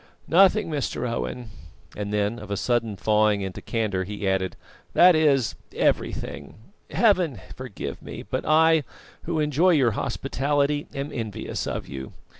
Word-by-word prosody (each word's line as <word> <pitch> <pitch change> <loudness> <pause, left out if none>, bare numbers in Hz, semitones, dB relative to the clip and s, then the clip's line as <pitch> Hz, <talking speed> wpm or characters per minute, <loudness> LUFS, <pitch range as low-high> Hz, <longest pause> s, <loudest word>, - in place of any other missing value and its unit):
"Nothing, 195 +3 +5
Mr. 145 -5 -2
Owen;" 115 0 -4 0.4
then, 105 +2 -1
of 105 - -10
a 100 - -2
sudden 115 -1 0
thawing 105 0 +2
into 95 -1 -5
candour, 105 -5 -1
he 100 +1 -4
added: 95 -1 0 0.4
"that 180 +1 +7
is, 140 -6 +3 0.2
everything. - - -1 0.3
Heaven 185 - +2 0.2
forgive 130 -5 -6
me; - - -8
but - - -3
I, 160 0 +4 0.4
who 165 -1 -1
enjoy 155 +5 +3
your 130 -7 +4
hospitality, 140 +4 -1
am 140 +2 -4
envious 110 -5 -4
of - - -4
you. 65 -1 -7
125 Hz, 135 wpm, -25 LUFS, 105-155 Hz, 0.4 s, that